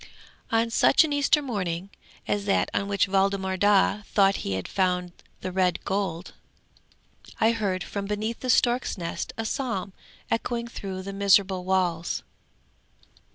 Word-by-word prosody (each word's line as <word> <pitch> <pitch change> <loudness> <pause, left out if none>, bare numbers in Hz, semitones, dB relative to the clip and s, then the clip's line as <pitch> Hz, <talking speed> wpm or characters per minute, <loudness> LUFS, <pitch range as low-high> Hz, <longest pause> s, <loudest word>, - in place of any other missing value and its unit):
'On 230 0 +2
such 275 - +5
an 305 -2 -1
Easter 290 +1 +3
morning 195 -6 -3 0.4
as 205 -1 -1
that 200 - +1
on 200 - 0
which 200 -1 +1
Waldemar 195 0 +1
Daa 205 +1 +3
thought 195 -1 +3
he 100 - -3
had 95 0 -3
found 180 -2 0 0.3
the 185 - -4
red 180 -1 0
gold, 190 -3 -2 1.1
I 225 - +4
heard 200 -5 -1
from 200 -1 -5
beneath 215 +3 -3
the 255 - -5
stork's 245 0 +2
nest 170 -2 -4
a 225 - -3
psalm 210 -6 -3 0.4
echoing 235 +1 -1
through 190 -5 -6
the 195 +1 -6
miserable 195 -2 +3
walls. 180 -3 0
195 Hz, 145 wpm, -26 LUFS, 185-225 Hz, 1.1 s, such